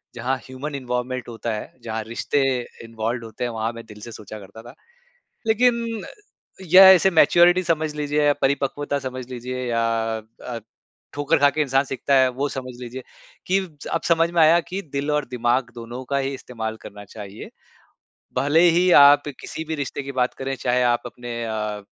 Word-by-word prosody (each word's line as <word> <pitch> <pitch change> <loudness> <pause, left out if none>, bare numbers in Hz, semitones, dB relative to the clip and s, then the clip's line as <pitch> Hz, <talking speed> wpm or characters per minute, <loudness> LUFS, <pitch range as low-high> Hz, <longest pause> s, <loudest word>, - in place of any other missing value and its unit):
जहाँ 125 +3 -1
human 135 +3 -6
involvement 125 -1 -3
होता 115 0 -4
है 105 - -6
जहाँ 110 -1 -4
रिश्ते 115 +5 -1 0.4
इन्वॉल्व्ड 115 +1 -3
होते 110 +1 -7
हैं 120 - -1
वहाँ 110 0 -2
मैं 115 0 -10
दिल 105 -1 -13
से 115 - -8
सोचा 110 -1 -9
करता 100 +3 -12
था। - - -12 0.7
लेक़िन 230 -1 +1 0.7
या 190 +1 +11
इसे 190 0 +6
मैच्योरिटी 175 +1 +5
समझ 155 -3 -1
लीजिए 150 0 0
या 145 - +5
परिपक्वता 140 +1 0
समझ 130 -2 -6
लीजिए 125 +1 -5
या 115 -1 0 0.6
अ, 120 -2 -5 0.5
ठोकर 145 0 +1
ख़ा 145 - +5
के 155 - -3
इंसान 135 -1 +2
सीखता 135 +1 -1
है 130 -1 +5
वो 145 - +1
समझ 130 -2 -6
लीजिए 125 +1 -7 0.4
कि 190 +2 +2 0.2
ज - - -9
अब 165 - +1
समझ 165 0 +3
में 170 -1 +1
आया 160 +2 +6
कि 190 +2 -3
दिल 140 +1 -2
और 150 0 +1
दिमाग़ 120 0 0
दोनों 120 +2 -8
का 140 - +1
ही 135 0 -2
इस्तेमाल 110 -4 -6
करना 105 0 -10
चाहिए। 100 0 -10 0.9
भले 145 +4 +3
ही 175 +2 +3
आप 145 +1 +7
किसी 160 - -6
भी 160 - -1
रिश्ते 140 - -5
की 140 0 -6
बात 125 - +1
करें 135 0 -4
चाहे 125 0 +1
आप 120 -1 +2
अपने 120 0 -6
अ, 105 -2 -3
130 Hz, 185 wpm, -23 LUFS, 115-150 Hz, 0.9 s, या